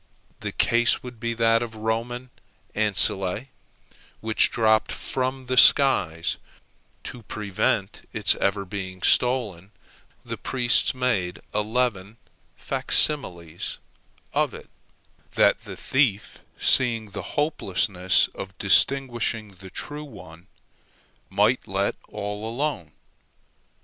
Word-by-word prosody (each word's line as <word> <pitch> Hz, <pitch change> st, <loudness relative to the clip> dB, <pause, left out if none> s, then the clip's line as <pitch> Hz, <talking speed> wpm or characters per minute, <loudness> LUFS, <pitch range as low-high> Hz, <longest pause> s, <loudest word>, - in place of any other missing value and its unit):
The -, -, -4 dB
case 120 Hz, +1 st, +2 dB
would 125 Hz, -2 st, -10 dB
be 115 Hz, 0 st, -2 dB
that 115 Hz, 0 st, +3 dB
of 120 Hz, -2 st, -5 dB
the -, -, -12 dB
Roman 115 Hz, +3 st, -3 dB, 0.4 s
ancile 100 Hz, 0 st, +2 dB, 0.7 s
which 110 Hz, 0 st, +2 dB
dropped 110 Hz, -1 st, +2 dB
from 130 Hz, 0 st, -3 dB
the 130 Hz, +1 st, -2 dB
skies; 90 Hz, -, +5 dB, 0.7 s
to 125 Hz, -, -8 dB
prevent 100 Hz, -1 st, -2 dB
its 105 Hz, -3 st, +3 dB
ever 100 Hz, 0 st, 0 dB
being 95 Hz, -2 st, -7 dB
stolen, 110 Hz, -8 st, +1 dB, 0.6 s
the -, -, -6 dB
priests 125 Hz, 0 st, +2 dB
made 110 Hz, -9 st, -1 dB
eleven 110 Hz, -1 st, -1 dB, 0.4 s
facsimiles 85 Hz, -, 0 dB, 0.6 s
of -, -, 0 dB
it, -, -, -13 dB, 0.6 s
that -, -, +3 dB
the -, -, -8 dB
thief, 125 Hz, -7 st, 0 dB, 0.2 s
seeing 115 Hz, -5 st, +2 dB
the 100 Hz, -, -5 dB, 0.2 s
hopelessness 95 Hz, -, +1 dB
of 95 Hz, -1 st, -9 dB
distinguishing 120 Hz, 0 st, +1 dB
the 95 Hz, 0 st, -11 dB
true 150 Hz, +9 st, -6 dB
one, 90 Hz, -, -13 dB, 0.8 s
might -, -, +1 dB
let -, -, -1 dB
all 105 Hz, +2 st, -5 dB
alone. 120 Hz, -, -3 dB
110 Hz, 105 wpm, -24 LUFS, 95-125 Hz, 0.8 s, skies